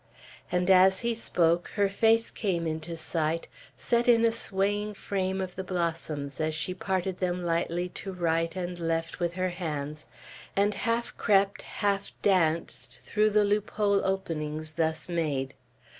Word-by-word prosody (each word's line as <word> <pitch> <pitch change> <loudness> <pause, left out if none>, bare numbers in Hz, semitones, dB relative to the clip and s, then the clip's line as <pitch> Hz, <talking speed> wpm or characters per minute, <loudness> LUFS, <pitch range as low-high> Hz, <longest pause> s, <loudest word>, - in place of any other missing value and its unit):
And 180 +1 +2
as 190 0 +6
he 235 0 +1
spoke, 175 -6 +1
her 205 -2 +3
face 225 +3 +3
came 175 -5 -1
into 160 +1 -3
sight, 160 0 -1 0.3
set 240 0 +1
in 230 -1 +6
a 230 - +4
swaying 205 -1 0
frame 190 -1 -2
of 185 -1 -4
the 190 - -4
blossoms, 165 -6 -3
as 155 0 0
she 170 +3 -1
parted 185 0 -2
them 180 -1 -1
lightly 170 +1 0
to 195 - -5
right 165 -1 0
and 180 -1 -4
left 165 0 -2
with 170 -1 0
her 185 0 0
hands, 155 -4 -4 0.5
and 205 +1 +3
half 230 +1 -1
crept, 200 -2 +3
half 200 -1 -1
danced 165 -8 +1
through 210 +12 +2
the 210 0 +4
loop 205 0 +1
hole 200 -2 +2
openings 155 -5 -2
thus 160 0 -1
made. 150 -6 -1
180 Hz, 155 wpm, -28 LUFS, 165-200 Hz, 0.5 s, as